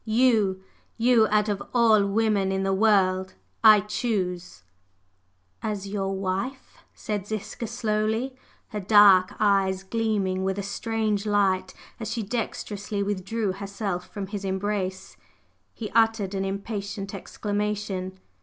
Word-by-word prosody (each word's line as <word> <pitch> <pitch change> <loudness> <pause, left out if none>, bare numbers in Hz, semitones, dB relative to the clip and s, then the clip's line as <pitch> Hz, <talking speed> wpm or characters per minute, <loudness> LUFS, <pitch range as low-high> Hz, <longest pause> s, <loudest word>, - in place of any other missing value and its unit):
You 215 -5 +2 0.3
you, 230 -1 +4
out 210 0 +2
of 205 -2 -1
all 220 -4 +5
women 205 -2 +1
in 190 0 -1
the 195 0 +1
world, 190 -2 +2 0.3
I 215 -2 +8
choose 180 - -3 0.5
…" 90 +1 -43
"As 200 -1 -5
your 195 -1 -2
wife?" 195 +8 -4
said 205 -2 -4
Ziska 215 +2 -5
slowly, 220 +2 -1 0.3
her 210 - -4
dark 195 -2 +6
eyes 195 -2 +2
gleaming 195 -3 -1
with 190 0 -1
a 200 - -2
strange 215 0 -1
light 190 -2 +1 0.2
as 220 -1 -4
she 230 -1 -2
dexterously 205 -2 -3
withdrew 205 +1 -2
herself 195 -1 -4
from 200 -1 -4
his 200 +1 -6
embrace. 190 -1 -3 0.5
He 215 -3 -7
uttered 225 -3 +2
an 195 0 -1
impatient 200 0 -4
exclamation. 205 -2 -3
205 Hz, 125 wpm, -25 LUFS, 190-215 Hz, 0.5 s, I